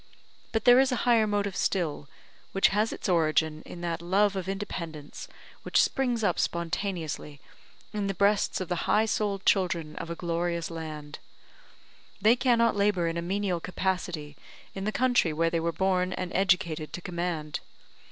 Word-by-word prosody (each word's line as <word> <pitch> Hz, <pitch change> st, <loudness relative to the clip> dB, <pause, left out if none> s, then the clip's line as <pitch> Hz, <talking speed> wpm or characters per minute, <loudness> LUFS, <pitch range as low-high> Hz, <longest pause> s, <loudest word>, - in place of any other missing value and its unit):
But 225 Hz, -2 st, -1 dB
there 245 Hz, +1 st, +8 dB
is 265 Hz, 0 st, +3 dB
a -, -, +1 dB
higher 230 Hz, -3 st, +4 dB
motive 205 Hz, -2 st, -1 dB
still, 155 Hz, -6 st, -1 dB, 0.4 s
which 195 Hz, -, +4 dB
has 210 Hz, +3 st, +1 dB
its -, -, -5 dB
origin 160 Hz, -3 st, +2 dB
in 175 Hz, -, -9 dB
that 170 Hz, -1 st, -2 dB
love 195 Hz, +3 st, +2 dB
of 190 Hz, -1 st, -3 dB
independence 170 Hz, -7 st, -6 dB, 0.3 s
which -, -, +1 dB
springs 245 Hz, -4 st, +1 dB
up -, -, +1 dB
spontaneously 170 Hz, -4 st, -3 dB, 0.5 s
in 205 Hz, -2 st, -1 dB
the 195 Hz, -, -2 dB
breasts 200 Hz, +2 st, +2 dB
of 185 Hz, -, -3 dB
the 175 Hz, 0 st, -2 dB
high 215 Hz, +1 st, +4 dB
souled 205 Hz, -3 st, -1 dB
children 175 Hz, -5 st, +1 dB
of 170 Hz, -, -5 dB
a 170 Hz, -, -3 dB
glorious 170 Hz, 0 st, -2 dB
land. 155 Hz, -3 st, -7 dB, 1.0 s
They 215 Hz, +4 st, +5 dB
cannot 235 Hz, -3 st, +3 dB
labour 200 Hz, -4 st, +2 dB
in 165 Hz, -, -4 dB
a -, -, -1 dB
menial 185 Hz, 0 st, -1 dB
capacity 180 Hz, -4 st, -3 dB, 0.4 s
in 195 Hz, 0 st, -5 dB
the 215 Hz, -, 0 dB
country 245 Hz, -10 st, +2 dB
where 165 Hz, +2 st, +1 dB
they 165 Hz, -, +1 dB
were 165 Hz, +1 st, 0 dB
born 185 Hz, 0 st, +1 dB
and 180 Hz, -1 st, -4 dB
educated 170 Hz, -5 st, +1 dB
to 180 Hz, -, -5 dB
command. 170 Hz, -4 st, -3 dB
180 Hz, 165 wpm, -28 LUFS, 165-205 Hz, 1.0 s, there